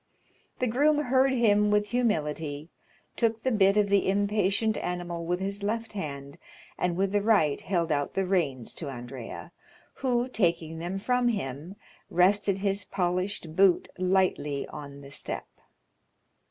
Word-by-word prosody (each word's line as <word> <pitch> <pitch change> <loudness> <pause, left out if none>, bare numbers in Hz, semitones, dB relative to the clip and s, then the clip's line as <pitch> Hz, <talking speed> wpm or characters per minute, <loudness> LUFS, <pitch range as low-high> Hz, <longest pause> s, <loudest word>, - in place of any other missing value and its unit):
The 255 - 0
groom 285 +6 +3
heard 265 -2 +3
him 210 -4 +3
with 210 0 +2
humility, 155 -9 -1 0.4
took 225 -1 0
the 260 - +1
bit 200 -2 +4
of 210 -1 +4
the 200 -1 +2
impatient 205 +2 +1
animal 175 -1 -4
with 180 +1 0
his 200 +1 -3
left 225 +2 -2
hand, 140 -7 -6 0.4
and 180 -1 -1
with 195 0 +1
the 205 0 +2
right 200 -10 +3
held 170 -4 -1
out 145 -1 -1
the 195 - +1
reins 150 -11 0
to 150 - -4
Andrea, 125 +5 -8 0.5
who, 245 -2 0
taking 170 -8 0
them 175 +3 -3
from 250 +4 +1
him, 165 - -3 0.3
rested 195 +2 +3
his 195 0 -1
polished 180 -2 -2
boot 190 -1 +4
lightly 185 -6 +1
on 140 -2 -9
the 140 0 -12
step. - - -4
190 Hz, 145 wpm, -28 LUFS, 160-210 Hz, 0.5 s, bit